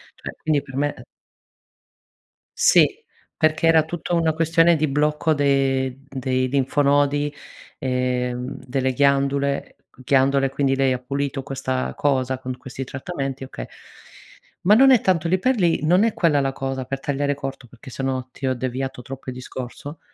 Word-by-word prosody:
Cioè - - -8
quindi 155 -2 +2
per 135 -1 -12
me, 145 +1 0
eh - - -12 1.5
Sì, - - +6 0.5
perché 155 0 +2
era 165 -1 +5
tutta 175 +2 -5
una 165 -2 +2
questione 165 +1 +3
di 155 0 +1
blocco 150 +3 +1
de 135 -2 +1
dei 130 -1 -1
linfonodi 145 +2 +2 0.5
e, 125 -1 -1
uhm, 125 +2 -6
delle 130 0 -1
ghiandule 140 +1 +1 0.3
ghiandole 135 +1 +3
quindi 135 0 0
lei 135 -1 +2
ha 125 - -3
pulito 135 +1 -3
questa 130 -1 -3
cosa 130 -2 0
con 130 -1 -5
questi 130 +1 -7
trattamenti 135 0 -5
okay. - - -7 1.0
Ma 205 +4 +6
non 270 +3 +7
è 250 - +5
tanto 170 -3 +1
lì 185 +3 +2
per 260 +7 +2
lì, 175 -5 +2
non 180 +6 +4
è 230 -1 +2
quella 160 -5 +2
la 135 -1 0
cosa 135 -1 -4
per 135 +2 -4
tagliare 145 +1 -1
corto, 135 -2 -6
perché 125 +3 -14
se 135 - -6
no, 130 -1 -2
ti 135 - -7
ho 130 - +2
deviato 130 +1 -4
troppo 135 +1 -8
il - - -10
discorso, 130 +4 -8
135 Hz, 165 wpm, -22 LUFS, 130-150 Hz, 1.5 s, non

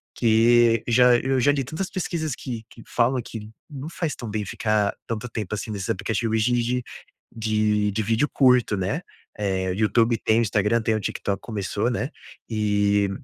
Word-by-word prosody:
que 115 0 +4
já 125 +1 +5
eu 135 +1 0
já 140 +4 +4
li 140 -1 0
tantas 160 +9 -4
pesquisas 170 -6 -3
que 120 -4 -6
que 115 - -14
falam 125 +2 +1
que 110 -1 -8 0.2
não 145 0 -7
faz 165 -2 -3
tão 120 -3 -7
bem 105 0 -3
ficar 105 0 0
tanto 115 +1 -3
tempo, 110 -3 -4
assim, 110 - -5
nesses 100 -2 -4
aplicativos 110 +3 0
e - - +2
de 120 - +2
de 125 +1 -1 0.5
de 105 -2 +1
de 110 +2 -1
vídeo 115 +7 +1
curto, 125 -5 +4
né, 95 - -1 0.4
eh, 95 -2 -1
YouTube 115 +3 +2
tem 110 +1 +3
o - - +3
Instagram, 105 +1 +1
tem 110 0 +1
o 110 - 0
TikTok 100 -1 -3
começou, 105 0 -2
né, 125 +3 -2 0.4
e 105 -2 +1
110 Hz, 180 wpm, -24 LUFS, 105-125 Hz, 0.5 s, já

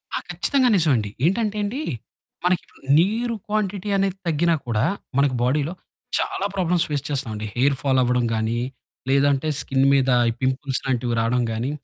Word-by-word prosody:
ఆ! - - +1
ఖచ్చితంగా 265 -3 +2
నిజం 165 -5 +3
అండి. 105 -3 -1 0.2
ఏంటంటే 210 +4 +1
అండి, 235 +8 -3 0.6
మనకిప్పుడు 180 0 -1 0.2
నీరు 230 +6 +1
క్వాంటిటీ 205 -2 -2
అనేది 195 -1 0
తగ్గినా 165 +1 +2
కూడా 110 -2 +1 0.3
మనకి 140 -2 +3
బాడీ‌లో 145 +6 +1 0.4
చాలా 195 - -1
ప్రాబ్లమ్స్ 180 -2 +1
ఫేస్ 145 -2 -1
చేస్తామండి. 115 -7 -2
హెయిర్ 135 +3 +3
ఫాల్ 135 -2 +2
అవ్వడం 125 -1 +1
గానీ, 110 +1 -1 0.5
లేదంటే 140 +1 +2
స్కిన్ 135 0 +1
మీద 135 -1 +3 0.2
ఈ - - +1
పింపుల్స్ 130 0 -1
లాంటివి 125 -2 0
రాడం 120 +2 +1
గానీ, 115 +5 -2
140 Hz, 150 wpm, -23 LUFS, 125-185 Hz, 0.6 s, నిజం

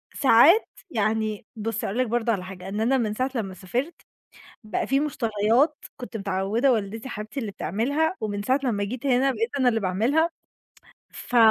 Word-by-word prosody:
وساعات 280 - +6 0.2
يعني 215 -1 -1
بُصّي 225 +1 -3
هاقول 250 +6 0
برضه 235 0 0
على 185 -4 -3
حاجة، 185 0 -8
إن 210 +2 -3
أنا 265 +4 +3
من 215 -4 -1
ساعة 255 +4 -1
لمّا 195 -5 -3
سافرت، 245 - -4 0.6
بقى 215 - -2
في 270 +1 +2
مشتريات 245 +1 +1
كنت 245 -2 -7
متعوّدة 200 +6 +1
والدتي 220 +2 -3
حبيبتي 215 +3 -5
اللي 220 - -4
بتعملها، 285 - 0
ومن 205 -2 -3
ساعة 260 +5 +1
لمّا 205 -5 0
جيت 250 +6 -5
هنا، 265 +1 +3
بقيت 230 0 -2
أنا 260 -2 +4
اللي 225 -2 +1
باعملها، 235 - +1 0.8
ف 245 - -4
225 Hz, 165 wpm, -25 LUFS, 210-260 Hz, 0.8 s, وساعات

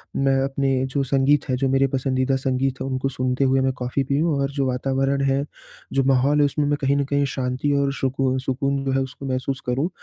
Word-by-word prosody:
मैं 135 0 +2
अपने 135 -1 0
जो 140 - +2
संगीत 135 +2 +2
है 130 - +2
जो 135 +1 0
मेरे 135 +1 +3
पसंदीदा 130 0 0
संगीत 130 0 -1
है - - -2
उनको 135 +1 -1
सुनते 130 +1 -1
हुए 135 0 +3
मैं 130 0 +1
कॉफ़ी 130 +2 -1
पीऊँ 145 +4 +1
और 140 0 0
जो 140 -1 -1
वातावरण 135 +2 0
है, 135 +1 +1 0.5
जो 135 0 +2
माहौल 135 +2 +3
है 145 - +5
उसमें 145 +1 0
मैं 145 0 +1
कहीं 140 +1 +2
न 140 - +2
कहीं 140 0 +1
शांति 130 +2 -1
और 140 0 0
सुकून 130 -1 0
सुकून 135 +1 -1
जो 135 - 0
है 135 - +1
उसको 135 +1 -6
महसूस 130 +1 -2
करूँ, 135 +8 0
135 Hz, 220 wpm, -22 LUFS, 130-140 Hz, 0.5 s, है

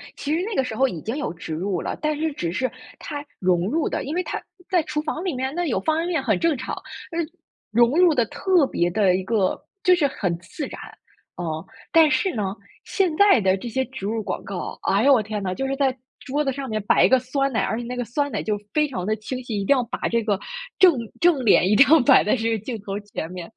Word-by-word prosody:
其 295 +2 -3
实 345 - -1
那 425 +1 -3
个 265 - +2
时 240 -3 -5
候 265 +3 +3
已 170 -9 -5
经 225 - -4
有 295 - -2
植 165 -1 -7
入 180 +2 -2
了， - - -3
但 305 -1 0
是 315 -1 -1
只 170 -11 -3
是 255 +8 -1 0.3
它 290 -2 -6 0.2
融 180 -1 +2
入 315 +3 0
的， - - -2
因 290 +5 -4
为 360 - 0
它 - - -4 0.3
在 360 -3 +3
厨 300 -1 -2
房 315 +2 -3
里 370 -4 -1
面， 260 +2 -2
那 350 0 0
有 230 -9 0
方 315 +10 0
便 335 - -1
面 335 -6 -1
很 215 -8 +1
正 330 -4 +2
常， 250 - -4 0.4
嗯， 330 -2 -2 0.4
融 235 +2 +4
入 360 -3 +6
得 240 -5 +2
特 365 - +2
别 175 -7 0
的 190 -1 +3
一 185 - -2
个， 195 -2 0 0.2
就 365 -4 +6
是 310 -5 +2
很 180 -10 -2
自 275 - -6
然， - - -9 0.6
嗯。 175 - -4 0.5
但 325 -2 +6
是 260 +8 +1
呢， 200 -4 -2 0.3
现 370 -6 0
在 405 - +6
的 190 -2 +2
这 215 +5 -6
些 260 +3 -1
植 260 -7 -8
入 220 +1 -1
广 - - -4
告， 195 -3 -6
哎 200 +3 +2
呦， 280 +1 +6
我 245 - +4
天 210 0 -4
呐， 185 - -1
就 270 +8 -3
是 275 - -1
在 270 -2 +1 0.2
桌 285 +3 -2
子 270 - 0
上 270 0 -5
面 215 -3 -2
摆 210 - +4
一 - - +4
个 260 - +5
酸 275 +2 -1
奶， 225 - +1
而 220 - -1
且 240 - -5
那 250 +1 -5
个 245 - -2
酸 285 +5 -2
奶， - - -2
就 210 -1 -1 0.2
非 300 -1 +3
常 185 -9 -4
地 215 +2 +1
清 250 +4 -5
晰， 220 -4 -3
一 - - -2
定 280 - +4
要 255 - +1
把 235 - -3
这 230 0 +1
个 205 -3 0 0.4
正 365 -2 +8 0.3
正 315 -8 +3
脸 190 -2 +5
一 210 - +4
定 270 +4 +7
要 320 +1 +7
摆 265 +1 +6
在 210 - +2
这 225 -2 -1
个 225 - +1
镜 235 -4 -4
头 200 0 -4
前 200 -5 -6
面。 180 +3 -8
255 Hz, 285 characters per minute, -23 LUFS, 205-300 Hz, 0.6 s, 正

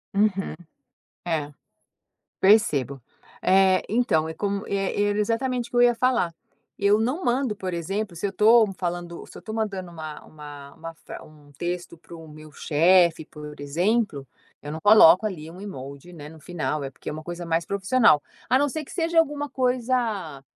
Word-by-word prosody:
Uhum. 195 -2 +1 0.7
É, 150 -3 -2 0.9
percebo. 150 - +3 0.4
Eh, 190 0 +4
então 200 -9 +1
é 160 - -5
como 200 +3 -3
era 205 +1 0
exatamente 240 +3 -1
o - - -38
que 245 - -2
eu - - +6
ia 240 0 +5
falar. 235 -8 +1 0.5
Eu 200 +2 +3
não 265 +11 -1
mando, 245 -3 0
por 185 -2 -5
exemplo, 190 +3 -3
se 170 - -4
eu 195 - -1
tô 225 +2 +5
falando 175 -1 -5
se - - -13
eu - - -11
tô 220 - -7
mandando 195 -5 -3
uma 155 -2 -8
uma 145 -2 -11
uma 165 0 -9
fra - - -11
um 150 -2 -18
texto 175 +3 -5
para 170 +1 -13
o 165 -1 -12
meu 155 0 -13
chefe, 165 +2 +3
por 150 -1 -11
exemplo, 170 - 0 0.3
eu 145 - -7
não 160 - -5
coloco 205 -1 +7
ali 160 -5 -7
um 180 - -12
emoji, 140 -3 -9
né, 150 -2 -10
no 160 0 -14
final, 155 -3 -3
eh, 135 - -4
porque - - -9
é - - -4
uma 155 0 -7
coisa 175 +1 -6
mais 165 0 0
profissional. 200 - +3 0.3
A 255 - +5
não 290 +2 +2
ser 310 +3 -4
que - - -14
seja 330 -1 +1
alguma 290 -2 0
coisa, 240 - -1
185 Hz, 180 wpm, -24 LUFS, 155-220 Hz, 0.9 s, coloco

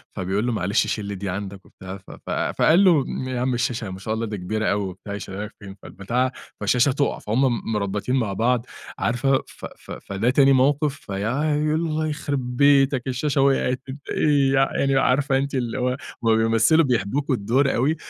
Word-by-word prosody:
فبيقول 95 +4 -1
له: 125 - 0
"معلش 100 -1 +1
شيل 105 - -3
لي 100 0 -4
دي 95 0 -5
عندك" 95 0 -6
وبتاع، 95 +1 -9
ف 95 - -15
ف - - -12
فقال 175 +5 +3
له: 165 -7 +5
"م 130 - -4
يا 125 -1 -2
عم 130 0 0
الشاشة 120 -3 -2
ما 95 0 -7
شاء 110 +3 -3
الله 115 +1 -2
دي 105 -1 -5
كبيرة 110 +4 -3
أوي"، 100 0 0
وبتاع، 100 +2 -9
"يشيلها 100 0 -5
لك 105 - -12
فين؟" 100 -2 -10
فالبتاعة 120 +7 -2 0.3
فالشاشة 125 +2 +2
تقع، 140 +1 -1
فهُم 110 +5 -1
م 115 -3 -1
مربّطين 105 +5 -1
مع 110 -7 0
بعض، 120 +3 +1 0.3
عارفة، 130 +3 +1
ف - - -11
ف - - -12
فده 100 +5 -2
تاني 135 +1 +5
موقِف، 140 +2 +2
فيا 130 +8 -2
يقُول: 155 +1 +1
"الله 155 -1 -1
يخربيتك 140 -2 +2
الشاشة 135 +2 0
وقعت، 130 -2 +2
أنت 140 +1 -9
إيه"، 140 -3 +2
يع 135 0 +2
يعني 135 -1 +2
عارفة 135 +1 +2
أنتِ 140 0 -2
اللي 120 -3 -2
هو 125 +1 0 0.3
هُم 115 -1 +4
بيمثلوا 115 +8 +3
بيحبوكوا 130 +4 0
الدور 125 +7 +1
أوي، 140 +7 +1
125 Hz, 195 wpm, -23 LUFS, 105-140 Hz, 0.3 s, له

